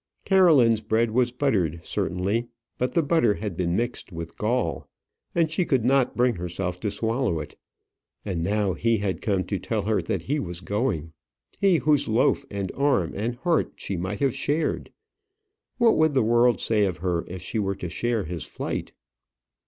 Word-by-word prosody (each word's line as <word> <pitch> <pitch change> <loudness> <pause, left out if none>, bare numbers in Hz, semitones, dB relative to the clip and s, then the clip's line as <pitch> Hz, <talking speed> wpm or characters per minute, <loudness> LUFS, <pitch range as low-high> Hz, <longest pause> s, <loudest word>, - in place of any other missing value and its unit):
Caroline's 150 - +5
bread 110 +1 +1
was 125 +1 +2
buttered, 100 - 0
certainly; 100 +7 -1 0.3
but 125 - 0
the 170 - +3
butter 140 -9 +3
had 105 -4 -4
been 85 0 0
mixed 120 -3 -2
with 85 -1 -7
gall, 105 - -1 0.5
and 165 -2 +2
she 170 +3 +1
could 130 -8 +1
not 135 0 +3
bring 120 -3 +2
herself 90 +1 -4
to 105 - -1
swallow 110 -2 -1
it. 75 - -8 0.7
And 90 -5 -2
now 100 +1 +1
he 115 +6 +1
had 95 -4 -2
come 95 -3 0
to 100 -1 -3
tell 110 -3 -2
her 110 +1 +1
that - - -3
he 145 +3 -1
was 90 -6 -5
going; 100 - -2 0.5
he 195 -4 +4
whose 150 0 +2
loaf, 110 +2 +2
and 100 -2 -3
arm, 140 - +1
and 115 +4 -2
heart 165 +6 0
she 100 - -4
might 95 +4 -4
have 135 -3 +2
shared. 155 +3 -1 0.9
What 235 -2 +4
would 155 -2 +3
the 130 - +4
world 120 +1 +4
say 105 -2 +2
of 90 -3 -2
her 85 -2 0
if 90 0 -7
she 110 - -2
were 100 -1 -1
to 90 - -5
share 115 +5 -1
his 85 -1 -5
flight? - - -5
110 Hz, 180 wpm, -25 LUFS, 95-130 Hz, 0.9 s, Caroline's